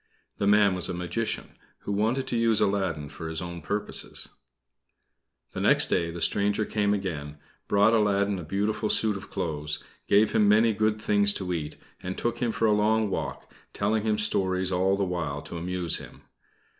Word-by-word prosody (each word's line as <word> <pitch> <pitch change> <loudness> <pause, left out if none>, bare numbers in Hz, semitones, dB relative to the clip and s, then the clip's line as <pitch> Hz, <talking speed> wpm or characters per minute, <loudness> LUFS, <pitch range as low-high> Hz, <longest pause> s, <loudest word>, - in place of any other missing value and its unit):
The 100 - +1
man 105 -1 +5
was 90 0 -1
a 90 - -3
magician, 90 +6 -4 0.2
who - - -5
wanted 115 +6 0
to 125 - -3
use 115 -2 +3
Aladdin 95 -7 0
for 80 +2 -7
his 80 -1 -3
own 85 -1 -6
purposes. 100 +7 -3 1.2
The - - -5
next - - +4
day 85 -2 +1
the 85 +1 -6
stranger 105 +4 +2
came 105 -1 0
again, 80 -8 -3 0.3
brought 105 +2 +4
Aladdin 100 -2 +2
a - - -6
beautiful 105 +5 -1
suit 110 -2 +1
of 100 - -8
clothes, 75 -2 -3 0.3
gave 105 +2 +4
him 105 - +3
many 110 +2 +4
good 110 +1 0
things 100 -1 +3
to 90 -2 -2
eat, 75 -3 -4 0.2
and 95 +1 -5
took 120 0 -2
him 120 -2 0
for 115 - 0
a 110 - +4
long 105 0 +2
walk, - - -5 0.2
telling 105 +2 0
him 110 0 0
stories 95 -3 0
all 95 +2 +2
the 100 - 0
while 80 -6 -3
to 85 - -7
amuse 90 -1 0
him. - - -13
100 Hz, 180 wpm, -27 LUFS, 90-105 Hz, 1.2 s, man